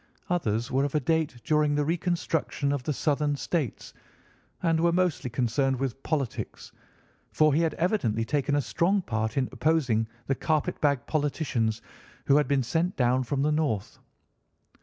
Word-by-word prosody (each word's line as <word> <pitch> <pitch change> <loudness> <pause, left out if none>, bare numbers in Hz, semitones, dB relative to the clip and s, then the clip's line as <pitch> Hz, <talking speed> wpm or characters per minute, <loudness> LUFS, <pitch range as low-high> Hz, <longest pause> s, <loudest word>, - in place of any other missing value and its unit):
Others 115 -9 0
were 135 +2 +2
of 145 +1 -2
a - - +4
date 150 -2 0
during 150 -1 +2
the 145 0 +1
reconstruction 165 -3 -1
of 145 -2 -1
the 140 - -2
Southern 145 0 0
states, 140 - -3 0.7
and 165 -2 +2
were 170 +1 +3
mostly 175 -7 0
concerned 125 +2 0
with 135 0 -3
politics, 140 -7 -3 0.6
for 155 -1 +4
he 155 - +3
had 165 -1 0
evidently 120 - 0
taken 145 +2 0
a 145 - +2
strong 170 - +1
part 110 -2 -2
in 130 -2 +2
opposing 130 -9 +1 0.2
the 135 - +1
carpet 155 +2 -1
bag 140 -4 +2
politicians 135 -7 -1 0.4
who 140 - +4
had 150 - +2
been 140 -2 +2
sent 165 +9 0
down 125 0 +2
from 135 +2 -1
the 150 - +2
North. 145 -10 -1
145 Hz, 160 wpm, -27 LUFS, 125-160 Hz, 0.7 s, a